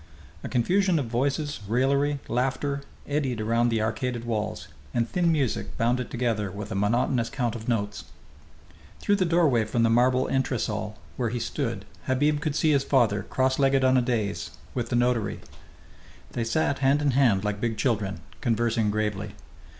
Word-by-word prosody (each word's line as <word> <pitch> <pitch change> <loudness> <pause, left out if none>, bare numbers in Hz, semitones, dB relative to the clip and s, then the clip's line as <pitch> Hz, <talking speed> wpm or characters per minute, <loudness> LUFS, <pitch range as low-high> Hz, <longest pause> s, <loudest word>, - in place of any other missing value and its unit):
A - - -4
confusion 180 +9 +2
of 140 - 0
voices, 140 +5 -1
raillery, 140 +5 +2
laughter, 135 +3 -1 0.3
eddied 140 -5 -1
around 115 +2 +2
the 115 -1 +1
arcaded 120 +1 -2
walls, 110 -2 -3 0.3
and 120 -1 +2
thin 170 +5 +1
music 140 -8 -1
bound 120 +2 +2
it 125 - -4
together 115 -4 -1
with 100 +2 -7
a - - -1
monotonous 115 +4 +1
count 120 -4 -1
of 110 -1 -7
notes. 105 -3 -1 0.9
Through 205 - +2
the 185 - +2
doorway 165 -9 +3
from 115 +2 0
the 115 - +3
marble 125 +2 +3
entresol 110 -5 -1 0.2
where 120 -3 0
he 120 +2 -3
stood 115 - -3 0.2
Habib 145 +3 +2
could 150 -1 -1
see 155 0 +3
his 140 -2 +3
father, 115 -7 +2
cross 130 +5 0
legged 135 -1 +3
on 130 0 +4
a 130 - +5
dais, 115 -5 -1 0.2
with 120 - -2
the 120 - 0
notary. 120 -3 +1 0.9
They 115 - -2
sat 135 +4 0
hand 140 +2 +3
in 145 - +3
hand 120 -7 +3
like 105 0 -2
big 115 -2 -1
children, 100 -8 -1 0.2
conversing 115 -2 +1
gravely. 105 -1 -2
120 Hz, 170 wpm, -26 LUFS, 110-135 Hz, 0.9 s, a